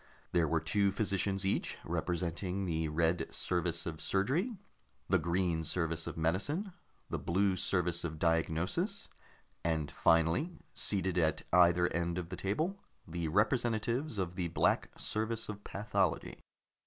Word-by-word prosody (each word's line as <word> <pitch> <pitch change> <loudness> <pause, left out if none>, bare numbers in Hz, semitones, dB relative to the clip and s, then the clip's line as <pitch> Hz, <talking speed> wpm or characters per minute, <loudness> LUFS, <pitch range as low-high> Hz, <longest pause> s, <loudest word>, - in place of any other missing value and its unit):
There 85 -2 +3
were 80 +2 +2
two 100 +5 +2
physicians 100 -1 0
each, 95 - 0
representing 90 +3 -2
the 80 -2 0
Red 80 +3 +1
Service 85 -2 -1
of 80 -2 -5
Surgery, 155 - 0 0.5
the 95 0 +3
Green 85 0 0
Service 80 -1 -1
of - - -5
Medicine, 145 - 0 0.4
the - - -1
Blue 95 +2 +2
Service 90 -2 +1
of 80 -2 -4
Diagnosis, 85 - 0 0.5
and 80 -3 0
finally, 85 - +2 0.2
seated 95 -3 +1
at 80 -2 +1
either 90 0 +6
end 85 +1 -1
of 85 -2 -4
the 95 - -4
table, 155 - -1 0.3
the 85 0 -3
representatives 115 - +1
of 90 -3 -1
the 90 -2 0
Black - - +2
Service 110 +1 -1
of 105 -1 -6
Pathology. 105 +2 -1
90 Hz, 135 wpm, -33 LUFS, 85-105 Hz, 0.5 s, either